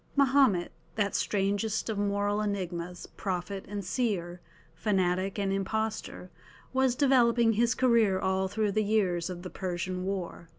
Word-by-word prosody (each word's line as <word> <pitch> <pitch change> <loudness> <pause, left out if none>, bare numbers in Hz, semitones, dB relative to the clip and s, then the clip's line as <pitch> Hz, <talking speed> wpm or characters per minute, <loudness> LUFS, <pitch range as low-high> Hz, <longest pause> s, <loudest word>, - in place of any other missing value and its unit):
Mahomet, 270 -10 +4 0.2
that 205 -2 0
strangest 205 +2 0
of 220 - -1
moral 205 +1 0
enigmas, 180 -4 -3
prophet 190 0 -3
and 200 -1 -5
seer, 180 -6 -2 0.3
fanatic 190 -1 0
and 195 -1 0
impostor, 215 -2 -3 0.4
was 260 -1 +2
developing 240 -4 +4
his 235 +2 +2
career 230 -6 +3
all 190 0 0
through 210 +1 0
the 215 +2 +1
years 190 -5 +1
of 180 -1 -6
the 185 - -7
Persian 185 0 -3
war. 185 -3 -4
200 Hz, 135 wpm, -29 LUFS, 185-220 Hz, 0.4 s, Mahomet